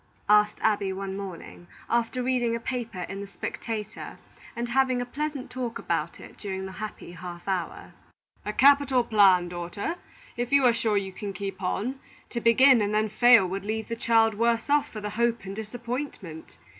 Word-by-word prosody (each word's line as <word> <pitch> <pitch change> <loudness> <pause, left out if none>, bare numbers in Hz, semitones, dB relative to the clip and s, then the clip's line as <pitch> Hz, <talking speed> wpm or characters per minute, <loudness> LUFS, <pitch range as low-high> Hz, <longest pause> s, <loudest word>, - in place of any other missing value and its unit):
asked 210 0 +5
Abby, 205 -3 +2
one 190 0 -4
morning, 185 -3 -8 0.2
after 235 +2 0
reading 245 -2 +1
a - - -3
paper 230 -6 -4
in 195 +2 -5
the 200 - -7
Spectator, 215 +1 -6 0.4
and 240 0 -3
having 260 0 +2
a 245 - -2
pleasant 285 +1 -4
talk 250 -2 -4
about - - -2
it - - -13
during 190 -2 -4
the 190 - -7
happy 215 -2 -7
half 175 0 -9
hour. 185 -3 -3 0.5
"A 210 - -3
capital 275 +1 +5
plan, 195 -6 +5
daughter, 175 - -4 0.4
if 240 +1 -3
you 280 -2 +5
are 240 - +6
sure 220 -2 +1
you 190 -1 -3
can 200 +1 -6
keep 195 +1 -6
on. 230 +8 -2 0.3
To 235 - -3
begin 250 +1 +6
and 205 0 0
then 215 0 +1
fail 230 -2 +6
would 195 +1 -4
leave 220 +2 -3
the 230 - -2
child 225 -1 +3
worse 230 +4 0
off 295 0 +3
for 215 - -7
the 210 0 -4
hope 235 0 0
and 195 +1 -6
disappointment. 225 - -6
220 Hz, 180 wpm, -26 LUFS, 195-245 Hz, 0.5 s, are